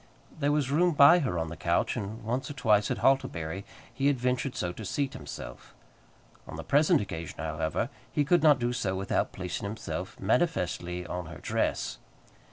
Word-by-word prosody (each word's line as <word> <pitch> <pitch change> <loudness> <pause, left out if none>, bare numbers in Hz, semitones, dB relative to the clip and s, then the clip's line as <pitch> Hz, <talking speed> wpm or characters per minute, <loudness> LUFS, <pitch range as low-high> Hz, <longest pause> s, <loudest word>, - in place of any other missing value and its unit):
There 145 -1 +2
was 145 -3 +1
room 175 +4 +3
by 145 +5 +8
her 110 - -1
on 80 -1 -2
the 85 - -6
couch, - - 0
and 105 +3 -5
once 125 +5 -2
or - - -5
twice, 105 -5 +3
at - - -1
Hartlebury, 95 -9 +1 0.3
he 135 - +1
had 145 -2 +3
ventured 125 +1 0
so 90 - -2
to 110 - -8
seat 135 +7 -2
himself. - - -9 0.7
On - - -7
the 80 - -6
present 150 - +4
occasion, 85 -5 -6
however, 80 +1 -1 0.2
he 145 - +1
could 175 +3 +4
not 150 -3 +6
do 120 0 -1
so 100 -6 -1
without 95 +1 0
placing 90 +1 -4
himself 100 -3 -5
manifestly 90 - 0
on 90 -2 -5
her 85 - -9
dress. - - -1
110 Hz, 180 wpm, -29 LUFS, 90-140 Hz, 0.7 s, by